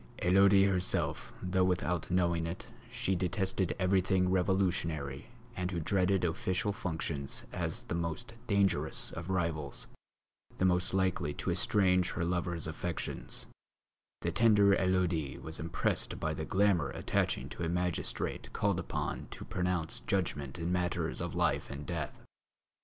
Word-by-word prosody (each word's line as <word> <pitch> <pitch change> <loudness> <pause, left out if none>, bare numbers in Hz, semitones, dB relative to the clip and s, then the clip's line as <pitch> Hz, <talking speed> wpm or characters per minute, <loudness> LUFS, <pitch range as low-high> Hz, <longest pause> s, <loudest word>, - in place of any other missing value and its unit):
Élodie 95 +2 +6
herself, 95 -1 0
though 90 0 +2
without 90 -2 0
knowing 85 -2 +2
it 85 - -5 0.2
she 95 - -1
detested 95 0 0
everything 95 0 +2
revolutionary 90 -6 0 0.3
and 90 -4 -1
who 90 -2 -2
dreaded 95 +2 +2
official 90 +3 0
functions 80 -9 -3
as - - -2
the - - -5
most 85 +4 -3
dangerous 95 -7 +2
of 85 +2 -6
rivals, 85 -7 -1 0.7
the 95 - +2
most 90 +1 +2
likely 90 -6 +1
to - - -2
estrange 90 -3 +3
her 85 - -1
lover's 85 -1 -1
affections, 80 +1 -4 0.8
the 85 - 0
tender 100 -1 +5
Élodie 90 -6 +1
was 80 0 -5
impressed 80 +2 -1
by 80 - -1
the 80 0 -4
glamour 95 -5 +3
attaching - - 0
to - - -8
a 85 - 0
magistrate 90 0 -2
called 100 -3 +1
upon 90 - -3
to - - -8
pronounce 90 -3 -1
judgment 75 -8 -2
in 85 +1 -2
matters 90 -1 -1
of - - -3
life - - +1
and 70 +1 -6
death. - - -4
90 Hz, 135 wpm, -32 LUFS, 85-95 Hz, 0.8 s, Élodie